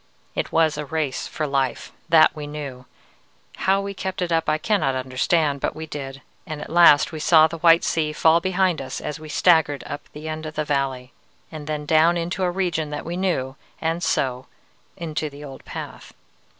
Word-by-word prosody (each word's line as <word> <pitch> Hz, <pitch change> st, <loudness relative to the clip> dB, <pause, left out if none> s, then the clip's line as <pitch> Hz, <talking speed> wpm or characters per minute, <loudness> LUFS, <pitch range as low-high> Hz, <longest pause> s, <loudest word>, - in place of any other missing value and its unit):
"It -, -, -3 dB
was 160 Hz, -2 st, +2 dB
a 150 Hz, -, -3 dB
race 150 Hz, -3 st, -2 dB
for 155 Hz, -, -3 dB
life; 135 Hz, -3 st, -1 dB, 0.2 s
that 160 Hz, -1 st, +6 dB
we 150 Hz, -1 st, -6 dB
knew. 140 Hz, -4 st, -7 dB, 0.7 s
How 195 Hz, +1 st, +2 dB
we 200 Hz, 0 st, -5 dB
kept 190 Hz, -1 st, -3 dB
it 175 Hz, -, -3 dB
up 165 Hz, -1 st, +1 dB
I 155 Hz, -, +2 dB
cannot 155 Hz, -6 st, 0 dB
understand, 140 Hz, +3 st, 0 dB
but -, -, -1 dB
we 160 Hz, -, -6 dB
did, 135 Hz, -3 st, -7 dB, 0.2 s
and 155 Hz, -1 st, -5 dB
at 150 Hz, -, -8 dB
last 155 Hz, -3 st, +6 dB
we 160 Hz, -, -6 dB
saw 155 Hz, 0 st, +6 dB
the 165 Hz, +1 st, -4 dB
white 165 Hz, 0 st, +5 dB
sea 155 Hz, -2 st, 0 dB
fall 160 Hz, +2 st, +4 dB
behind 185 Hz, -1 st, +1 dB
us 130 Hz, -, -5 dB
as 150 Hz, +1 st, -5 dB
we 155 Hz, 0 st, -10 dB
staggered 160 Hz, -4 st, +3 dB
up 145 Hz, -, -6 dB
the 150 Hz, +1 st, -8 dB
end 155 Hz, 0 st, -4 dB
of 155 Hz, -, -8 dB
the 155 Hz, -, -1 dB
valley, 135 Hz, -3 st, -2 dB, 0.4 s
and 155 Hz, -2 st, -8 dB
then 150 Hz, -1 st, -3 dB
down 160 Hz, +3 st, +4 dB
into 170 Hz, +3 st, -3 dB
a 180 Hz, -, +2 dB
region 175 Hz, -4 st, -1 dB
that 150 Hz, -, -5 dB
we 170 Hz, +2 st, -4 dB
knew, 170 Hz, -8 st, -1 dB, 0.2 s
and 165 Hz, +1 st, -1 dB
so 130 Hz, -5 st, -1 dB, 0.5 s
into 155 Hz, -2 st, -3 dB
the 145 Hz, +1 st, -12 dB
old 135 Hz, -2 st, -10 dB
path. -, -, -8 dB
155 Hz, 200 wpm, -23 LUFS, 145-170 Hz, 0.7 s, that